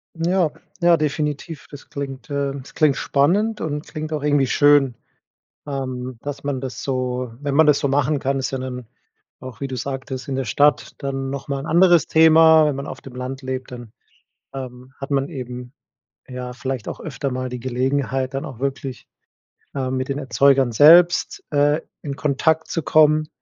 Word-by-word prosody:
Ja, 170 0 +1 0.3
ja, 170 -1 +5
definitiv. 150 +1 -3
Das 145 -1 -12
klingt 135 -3 -6
ähm, 140 -1 -2
das - - -15
klingt 155 -4 +3
spannend 205 +10 +1
und 150 -1 -4
klingt 155 -1 -6
auch 150 -2 -3
irgendwie 145 -2 +2
schön, 145 -3 +4 0.7
ähm, 130 -3 -5
dass 145 -1 -6
man 140 -2 -2
das 130 -1 -6
so 125 -2 -2
wenn 140 -1 -2
man 160 +2 +6
das 150 -1 +4
so 140 - 0
machen 145 +1 +1
kann, 135 +1 -1
ist 130 - -3
ja 135 - -3
dann 125 -1 -6 0.5
auch, 130 -1 -10
wie 140 - -2
du 130 - -5
sagtest, 130 +1 -5
in 135 - -3
der 135 0 -2
Stadt 145 +5 +2
dann 135 -1 -3
noch 140 -1 -6
mal 140 -1 -2
'n 135 - -7
anderes 175 0 +5
Thema. 160 0 +6
Wenn 150 -2 0
man 140 +1 -5
auf - - -8
dem 135 - -12
Land 130 +1 -5
lebt, 130 -1 -5
dann, 120 -3 -9 0.6
ähm, 130 -1 -8
hat 135 +1 -7
man 140 0 0
eben, 125 -4 -7 0.6
ja, 125 -1 -6
vielleicht 130 -2 -5
auch - - -6
öfter 140 -3 -4
mal 130 0 -3
die 125 0 -6
Gelegenheit, 130 +1 -1
dann 135 - -3
auch 125 - -8
wirklich, 135 -2 -4 0.7
ähm, 130 -1 -2
mit 130 0 -2
den 140 0 -2
Erzeugern 135 -1 +3
selbst, 175 - +5
äh, 145 +1 +3 0.2
in 140 -2 -4
Kontakt 155 +3 +1
zu 165 - -2
kommen. 155 0 +4
140 Hz, 185 wpm, -21 LUFS, 130-150 Hz, 0.7 s, man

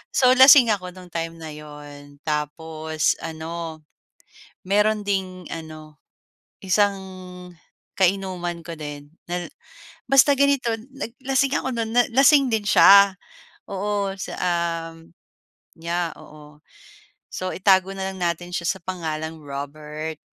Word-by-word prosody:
So 255 -1 +5
lasing 260 -2 +8
ako 185 -3 -3
no'ng 180 -1 -13
time 165 0 -4
na 160 -1 -9
'yon, 145 -1 -12
tapos 155 +1 -2
ano, 160 0 -6 0.8
mayro'n 210 +1 +1
ding 185 -3 -2
ano, 155 -1 -10 0.7
isang 200 +2 +2 1.0
kainuman 185 -2 0
ko 165 0 -8
din. 145 -1 -8 0.2
Na, 175 -1 -4 0.6
basta 275 +1 +5
ganito 280 -3 +2 0.2
nag 275 -4 -5 0.2
lasing 270 +1 +2
ako 260 -1 -3
no'n, 230 -1 -2 0.2
lasing 275 +1 +6
din 220 - 0
siya, 200 -1 +6 0.5
oo. 200 0 -2
Sa 190 - -6
uhm, 165 -2 -3 0.7
yeah, 170 0 -2
oo. 150 0 -15 0.7
So 185 0 -4
itago 190 0 +3
na 190 0 -3
lang 190 - -9
natin 175 0 -2
siya 175 -1 -3
sa 190 +1 -2
pangalang 160 -3 -4
Robert, 150 +2 -7
175 Hz, 120 wpm, -23 LUFS, 160-200 Hz, 1.0 s, lasing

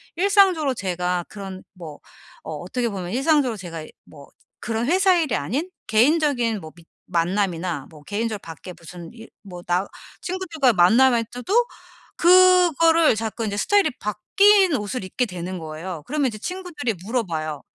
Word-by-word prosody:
일상적으로 370 -6 +3
제가 180 -3 -2
그런 195 -2 -8
뭐 165 -5 -10 0.4
어 - - -6
어떻게 245 -2 -3
보면 185 -3 -6
일상적으로 270 -2 +1
제가 165 -4 -8 0.2
뭐 145 -2 -15 0.3
그런 230 0 -2
회사 375 +3 +4
일이 310 -7 0
아닌 265 - -2 0.2
개인적인 240 - +2
뭐 155 0 -10
미ㅌ 170 -1 -18 0.2
만남이나 175 -3 -1
뭐 155 -2 -15
개인적으로 215 +2 -3
밖에 165 +3 -10
무슨 170 +1 -11
일 225 -1 -13
뭐 180 -3 -10
나 180 +3 +1 0.4
친구들과의 340 -8 0
만남일 230 +6 +4
때도 375 - 0 0.5
그거를 345 -4 +5
자꾸 225 +1 -3
이제 205 -1 -3
스타일이 405 - +3
바뀐 385 - +3
옷을 210 +1 -4
입게 215 +7 -2
되는 180 -2 -6
거예요. 160 +1 -7
그러면 290 -1 0
이제 215 - -5
친구들이 340 - -4
물어봐요. 160 - -3
225 Hz, 340 characters per minute, -22 LUFS, -, 0.5 s, 그거를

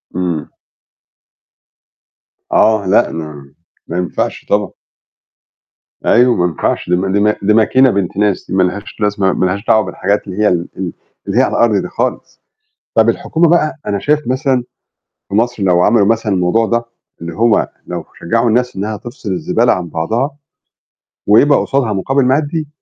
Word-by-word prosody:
امم. 85 -5 -2 2.0
آه، 110 -2 +3
لأ، 105 +5 +3
ما 75 -4 -8 0.3
ما 85 - -4
ينفعش 90 0 -3
طبعًا. 100 -2 +1 1.3
أيوه، 125 +1 +4
ما 90 - +1
ينفعش 85 0 -2
دي 90 - +3
ما 95 +1 -1
دي 100 - +2
ما 105 +1 +2
دي 105 +2 +2
ماكينة 130 +4 +4
بنت 100 -2 -2
ناس، 105 -2 0
دي - - -6
ما 95 - +3
لهاش 100 +3 -4
لازمة 105 -3 +1
ما - - 0
لهاش 100 +4 -2
دعوة 110 - +4
بالحاجات 100 +1 -1
اللي 95 +1 -7
هي - - +5
ال 85 -2 0
ال 95 -2 -4 0.3
اللي - - -1
هي - - +6
على - - 0
الأرض 115 -3 +3
دي - - -5
خالص، - - -4 0.5
طب - - +4
الحكومة 165 +1 +1
بقى، 165 -1 +2
أنا 100 -1 -1
شايف 150 +5 0
مثلًا 130 0 0 0.7
في 100 - -3
مصر 115 -1 0
لو 90 -2 +3
عملوا 115 -4 +4
مثلًا 110 -2 +1
الموضوع 95 +5 +2
ده، 115 +1 0 0.4
اللي 85 0 -6
هو 115 -1 +2 0.2
لو - - -5
شجعوا 115 +6 +1
الناس 125 +1 0
إنها 105 +2 -3
تفصل 120 -2 -7
الزبالة 90 - +1
عن 90 -2 -4
بعضها، 115 - -2 0.9
ويبقى 135 +8 +5
قصادها 130 -6 0
مقابل 130 +8 0
مادي، 150 +4 0
105 Hz, 165 wpm, -15 LUFS, 95-120 Hz, 2.0 s, هي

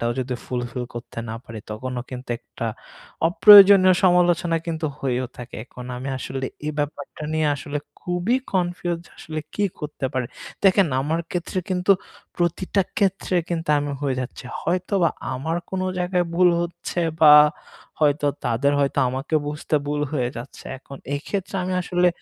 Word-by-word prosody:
টাও 120 0 0
যদি 130 0 -3
ফুলফিল 125 0 -3
করতে 120 0 -8
না - - -4
পারি 110 -1 -8
তখনও 125 +3 -4
কিন্তু 125 0 -7
একটা 115 - -6 0.6
অপ্রয়োজনীয় 200 -1 +9
সমালোচনা 175 -2 +3
কিন্তু 160 -1 -2
হয়েও 130 -1 -1
থাকে। 120 -1 -8
এখন 125 0 -11
আমি 130 +2 -5
আসলে 130 0 -4 0.2
এই 155 - -1
ব্যাপারটা 145 0 -4
নিয়ে 155 -1 +2
আসলে 145 +1 -4 0.2
খুবই 180 +7 0 0.2
কনফিউজড 175 -2 -1
আসলে 155 0 -5
কি 205 - +1 0.2
করতে 150 -3 -3
পারি? 130 -2 0 0.4
দেখেন 195 -1 +5
আমার 155 +4 0
ক্ষেত্রে 180 +1 -3
কিন্তু 185 +1 +3 0.4
প্রতিটা 180 +3 +1 0.2
ক্ষেত্রে 190 -2 +1
কিন্তু 165 -2 -2
আমি 145 0 -2
হয়ে 135 -2 0
যাচ্ছি। 130 +1 -7 0.2
হয়তোবা 180 0 +1 0.2
আমার 160 +6 -2
কোনো 185 0 -1
জায়গায় 180 0 0
ভুল 180 +1 +5
হচ্ছে 175 0 -4 0.2
বা 150 -2 +9 0.7
হয়তো 145 -1 +3 0.2
তাদের 135 +5 +2
হয়তো 140 - 0
আমাকে 135 +5 -3
বুঝতে 150 +1 -3
ভুল 145 0 -1
হয়ে 125 -5 0
যাচ্ছে। 120 +4 -9
এখন 140 +1 -11 0.2
এক্ষেত্রে 195 +7 -4
আমি 185 - -2
আসলে 180 0 +2
155 Hz, 150 wpm, -23 LUFS, 130-180 Hz, 0.7 s, অপ্রয়োজনীয়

